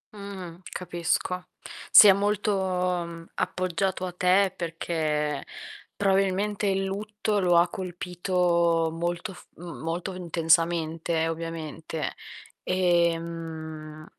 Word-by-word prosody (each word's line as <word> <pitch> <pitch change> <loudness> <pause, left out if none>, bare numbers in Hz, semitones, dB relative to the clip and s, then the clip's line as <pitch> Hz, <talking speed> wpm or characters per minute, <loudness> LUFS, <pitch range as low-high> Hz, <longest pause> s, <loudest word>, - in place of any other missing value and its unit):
Mh-mh, 190 -4 -8
capisco. 180 +1 -2 0.4
Si 210 - +11
è 195 - +9
molto, 205 +1 +1
mhmm, 180 -3 -1
appoggiato 185 +1 -1
a 180 - -4
te 185 +2 +3
perché 155 -4 -2 0.5
probabilmente 195 +1 +1
il 195 0 +1
lutto 210 +2 -2
lo 175 -2 +4
ha 170 +1 +5
colpito 175 -2 0
molto 175 +4 -3
f - - -15
mhmm, 170 0 -9
molto 170 +3 -3
intensamente, 165 -1 +1
ovviamente. 165 -1 -4 0.5
Ehm, 165 -3 -1
175 Hz, 95 wpm, -26 LUFS, 165-190 Hz, 0.5 s, Si